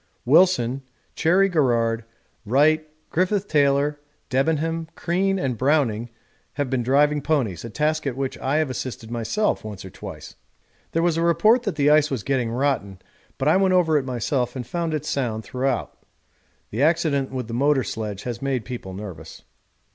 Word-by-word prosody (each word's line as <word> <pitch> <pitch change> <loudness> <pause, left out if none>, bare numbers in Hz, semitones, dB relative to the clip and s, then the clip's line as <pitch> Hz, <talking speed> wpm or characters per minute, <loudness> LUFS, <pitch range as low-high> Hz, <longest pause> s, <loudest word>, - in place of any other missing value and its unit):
Wilson, 140 -3 +4 0.3
Cherry 185 +4 +3
Garrard, 115 - +1 0.4
Wright, 155 +7 +3 0.2
Griffith 190 +3 +1
Taylor, 145 -1 +2 0.3
Debenham, 160 +4 0
Crean, 195 +3 0
and 130 - -2
Browning 125 -5 +1 0.4
have 140 -2 -2
been 130 -2 +1
driving 145 +4 +3
ponies, 130 - -1
a 115 - -6
task 155 +5 0
at 130 - -2
which 135 -1 -2
I 135 +2 -1
have 155 -3 +1
assisted 120 -3 -6
myself 120 - -1
once 105 -3 -8
or 95 - -9
twice. - - -9 0.6
There 165 - +1
was 170 -2 +2
a - - +1
report 170 +9 +4
that 200 - -1
the 145 0 +3
ice 150 0 +4
was 130 -7 -3
getting 130 -4 0
rotten, 120 -6 -1 0.4
but 135 - -1
I 160 - +5
went 190 -1 +3
over 165 -4 +3
it 145 - +3
myself 125 0 -2
and 125 -2 -4
found 165 +4 -2
it 150 -1 -4
sound 115 -7 -2
throughout. 130 0 -2 0.8
The 110 - -2
accident 150 -3 +2
with 130 -3 -4
the 115 - -6
motor 135 +2 +2
sledge 105 -4 -5
has 120 -1 -5
made 135 -4 -1
people 115 -7 -7
nervous. 90 -6 -9
140 Hz, 170 wpm, -23 LUFS, 120-155 Hz, 0.8 s, I